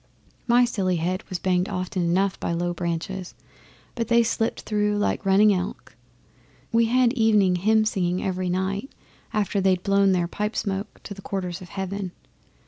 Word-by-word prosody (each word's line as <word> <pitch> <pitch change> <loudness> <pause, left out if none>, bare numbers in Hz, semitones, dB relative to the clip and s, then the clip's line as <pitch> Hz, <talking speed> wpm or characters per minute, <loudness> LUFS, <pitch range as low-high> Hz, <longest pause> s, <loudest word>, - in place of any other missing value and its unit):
My 245 +1 +5
silly 195 -6 0
head 180 +3 -2
was 185 - -2
banged 180 +1 0
often 185 -1 -2
enough 185 +3 +1
by - - -2
low 175 +1 -1
branches, 175 +2 -4 0.6
but 230 -3 -2
they 235 0 +4
slipped 225 0 -1
through 210 -1 0
like 205 0 -1
running 205 +2 +5
elk. 180 0 -5 0.8
We 230 -1 +4
had 245 +1 +3
evening 210 -7 +3
hymn 215 +4 +3
singing 180 -3 0
every 185 -1 -1
night 190 +7 -2 0.4
after 205 -1 0
they'd 185 -1 +2
blown 200 -1 +3
their 175 -2 +1
pipe 210 +4 -3
smoke 195 0 -3
to - - -7
the 195 - -11
quarters 185 -2 -4
of 180 - -10
heaven. 190 -1 -4
195 Hz, 165 wpm, -24 LUFS, 180-210 Hz, 0.8 s, My